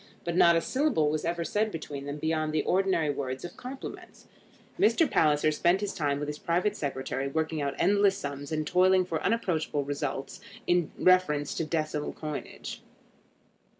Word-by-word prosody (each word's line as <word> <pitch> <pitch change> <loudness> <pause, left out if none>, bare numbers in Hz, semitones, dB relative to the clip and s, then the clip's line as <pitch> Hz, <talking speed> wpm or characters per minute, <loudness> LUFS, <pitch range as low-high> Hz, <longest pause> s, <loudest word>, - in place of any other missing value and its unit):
But 170 0 -2
not 170 -1 +6
a 165 - +3
syllable 250 - +1
was 155 0 -2
ever 170 0 -1
said 215 +4 0
between 145 -4 -6
them 145 +1 -4
beyond 155 0 -1
the 155 - +1
ordinary 185 -5 +2
words 135 +1 -4
of 175 - -8
compliments. 260 +2 -9 0.5
Mr. 235 +9 +4
Palliser 155 - +3
spent 175 +4 +2
his 205 -1 -2
time 145 -3 0
with 145 0 -4
his 150 0 -5
private 180 +5 0
secretary, 135 -3 -3
working 160 +2 -1
out 140 -1 -2
endless 200 +1 +3
sums 145 +1 -6
and 155 -1 -1
toiling 185 +2 +4
for 165 -3 -3
unapproachable 160 -10 0
results 140 -1 -4 0.2
in 175 -3 +2
reference 155 -6 +3
to 165 - -2
decimal 155 -2 -2
coinage. 150 -2 -6
160 Hz, 165 wpm, -28 LUFS, 145-185 Hz, 0.5 s, not